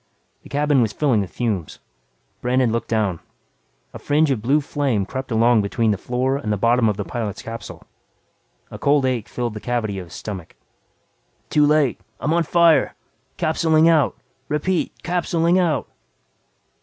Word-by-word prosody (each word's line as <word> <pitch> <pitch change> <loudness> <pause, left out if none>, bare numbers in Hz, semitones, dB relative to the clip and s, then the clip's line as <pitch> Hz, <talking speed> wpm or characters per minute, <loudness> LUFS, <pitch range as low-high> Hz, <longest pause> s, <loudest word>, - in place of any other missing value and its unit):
The - - -15
cabin 145 -1 +2
was 110 -3 0
filling 130 -6 +2
with 95 - -4
fumes. 105 -10 -3 0.6
Brandon 125 -1 +2
looked 115 +1 -2
down. 105 -7 0 0.7
A - - -8
fringe 150 0 +2
of 120 -5 -1
blue 135 +7 +3
flame 135 -8 -1
crept 130 +5 -6
along 115 0 +4
between 110 +2 0
the - - +1
floor 130 +4 -1
and 110 -7 -3
the 105 - 0
bottom 115 +2 +3
of 105 - -2
the 100 - -3
pilot's 110 -4 -4
capsule. 115 0 -8 0.9
A - - -8
cold 140 -1 +3
ache 125 -5 -1
filled 120 -2 -3
the 105 - -6
cavity 110 -5 -2
of 90 - -8
his - - -12
stomach. 95 -6 -7 1.0
"Too 150 -1 +4
late. 150 -4 +2 0.2
I'm 155 - 0
on 170 - +3
fire! 170 0 +3 0.4
Capsuling 160 0 +3
out. 155 -5 +3 0.3
Repeat, 165 +4 -1
capsuling 175 0 +1
out." 160 -7 0
125 Hz, 160 wpm, -21 LUFS, 110-150 Hz, 1.0 s, along